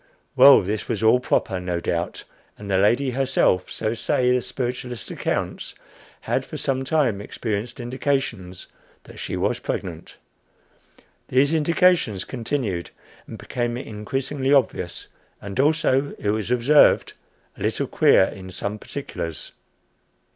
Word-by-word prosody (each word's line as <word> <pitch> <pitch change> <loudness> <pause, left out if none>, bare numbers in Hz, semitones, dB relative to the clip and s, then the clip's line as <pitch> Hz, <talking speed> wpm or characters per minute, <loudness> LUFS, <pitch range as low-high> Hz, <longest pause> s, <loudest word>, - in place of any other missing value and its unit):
Well, 135 -3 +8
this 105 +3 -3
was 110 -2 -2
all 110 +3 +5
proper, 110 -5 0
no 90 -1 -2
doubt, 85 0 -3 0.3
and 100 -1 -7
the 95 - +3
lady 120 +7 +2
herself 130 -8 +1
so 110 - -2
say 125 +2 +1
the 125 0 +2
spiritualist 125 -2 -4
accounts - - -3 0.5
had - - -1
for - - -8
some 135 -1 -1
time 135 -8 +1
experienced 110 +3 -4
indications 120 -7 -3 0.4
that - - -13
she - - -4
was - - 0
pregnant. - - -5 1.1
These 140 +4 +3
indications 160 - +2
continued, 115 -8 -3 0.4
and - - -8
became 120 -1 -3
increasingly 130 +5 -3
obvious, 110 -10 +1 0.3
and 100 +4 -7
also, 145 -2 +2
it 105 - -2
was 110 0 -2
observed, 125 +5 +4 0.4
a - - -15
little - - 0
queer - - +4
in 95 0 -5
some 100 +3 -4
particulars. 80 -5 -6
120 Hz, 130 wpm, -23 LUFS, 100-135 Hz, 1.1 s, Well